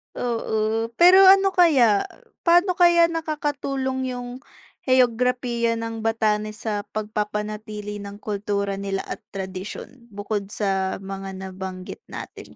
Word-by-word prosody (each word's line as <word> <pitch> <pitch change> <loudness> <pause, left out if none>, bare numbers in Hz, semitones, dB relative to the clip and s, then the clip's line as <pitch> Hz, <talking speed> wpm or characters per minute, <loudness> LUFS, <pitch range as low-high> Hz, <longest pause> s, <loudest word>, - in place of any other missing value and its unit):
Oo, 225 -1 -1
pero 360 +5 +7
ano 390 0 +6
kaya? 270 - +4 0.4
Pa'no 350 +1 +4
kaya 340 -1 +5
nakakatulong 280 -5 -2
yung 245 0 -6 0.6
heograpiya 245 -1 +2
ng 225 0 -5
Batanes 215 -1 -1
sa 205 -2 -3
pagpapanatili 210 0 -4
ng 200 0 -8
kultura 200 -1 -2
nila 195 -1 -3
at - - -6 0.2
tradisyon 195 +6 -7
bukod 205 -1 -4
sa 195 -2 -1
mga 195 0 -6
nabanggit 190 - -7
natin - - -10
220 Hz, 110 wpm, -23 LUFS, 200-260 Hz, 0.6 s, pero